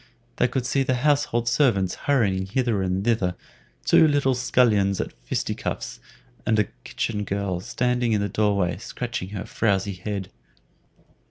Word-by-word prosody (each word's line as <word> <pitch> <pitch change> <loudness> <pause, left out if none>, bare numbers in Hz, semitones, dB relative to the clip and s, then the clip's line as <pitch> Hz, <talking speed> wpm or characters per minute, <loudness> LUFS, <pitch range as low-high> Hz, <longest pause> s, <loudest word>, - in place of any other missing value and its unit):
They 125 - +3
could 125 0 -2
see 135 +2 +1
the 130 -1 +1
household 140 -3 +1
servants 120 -8 +2 0.2
hurrying 100 -9 +2
hither 115 -1 0
and 95 +1 -1
thither, 100 -7 +1 0.5
two 160 - +6
little 145 -3 +2
scullions 110 -6 +2
at - - -3
fisticuffs, - - -4 0.4
and 110 -2 +2
a 105 - +5 0.2
kitchen 105 -2 -2
girl 100 -2 -2
standing 125 +4 0
in 105 - +2
the 100 - 0
door 105 +1 +1
way 90 -3 0
scratching 120 -2 -5
her 100 -2 -5
frowzy 100 -2 0
head. 95 0 -5
105 Hz, 150 wpm, -24 LUFS, 95-125 Hz, 0.5 s, two